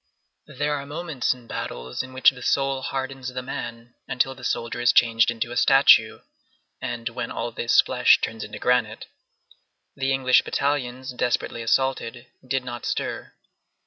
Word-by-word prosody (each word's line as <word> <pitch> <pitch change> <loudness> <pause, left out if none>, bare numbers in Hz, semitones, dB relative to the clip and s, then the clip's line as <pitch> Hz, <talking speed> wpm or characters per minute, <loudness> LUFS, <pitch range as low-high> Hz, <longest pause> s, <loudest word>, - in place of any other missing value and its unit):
There 145 +3 -2
are 140 -1 -4
moments 155 -3 -2
in 125 -2 -5
battles 60 - -5
in 130 - -9
which 130 +2 +5
the 125 -2 -13
soul 135 +1 0
hardens 135 -1 -4
the 125 0 -5
man 120 -2 -7
until 135 +1 0
the 125 -1 -15
soldier 115 0 -2
is 120 - +5
changed 115 -1 +4
into 120 0 -3
a - - -5
statue, 130 -4 +5 0.6
and 120 -1 -4
when 120 0 -5
all 120 +1 -4
this 115 +1 +4
flesh - - +4
turns 110 -1 -4
into - - -8
granite. 120 -3 0 0.9
The 135 -1 -1
English 130 -1 +4
battalions, 130 -2 -2
desperately 120 -1 -1
assaulted, 125 0 0 0.2
did 130 0 -1
not 120 -1 -6
stir. - - -3
125 Hz, 155 wpm, -24 LUFS, 120-135 Hz, 0.9 s, which